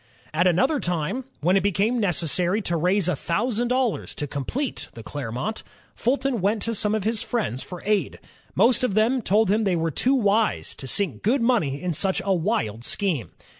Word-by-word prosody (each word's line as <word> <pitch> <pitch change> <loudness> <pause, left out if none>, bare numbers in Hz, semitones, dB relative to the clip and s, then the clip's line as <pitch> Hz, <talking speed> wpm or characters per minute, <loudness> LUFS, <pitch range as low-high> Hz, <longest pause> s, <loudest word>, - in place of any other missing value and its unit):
At 170 +4 +3
another 260 - +2
time, 175 - -2 0.2
when 180 +5 +3
it 195 - +4
became 205 +5 +1
necessary 180 0 +1
to 175 - 0
raise 180 +3 +2
a 180 - +1
thousand 225 - -1
dollars 250 -2 -1
to 150 - -3
complete 150 - -4
the 115 - -9
Clermont, 140 - -4 0.3
Fulton 255 -2 0
went 205 +2 +1
to 230 - -1
some 215 0 +1
of 215 - -2
his 220 +1 0
friends 130 - -2
for 180 -1 -8
aid. 210 -2 0 0.4
Most 230 +5 +4
of 215 -6 0
them 235 +4 +3
told 210 -1 +2
him 220 +2 +2
they 190 -4 +1
were 165 -1 0
too 260 - +2
wise 215 -2 +1
to 135 - -6
sink 200 +8 0
good 235 +4 +2
money 170 - +1
in 180 +1 -2
such 190 +5 +1
a 195 - +2
wild 165 - -1
scheme. 170 - -1
200 Hz, 190 wpm, -24 LUFS, 170-230 Hz, 0.4 s, it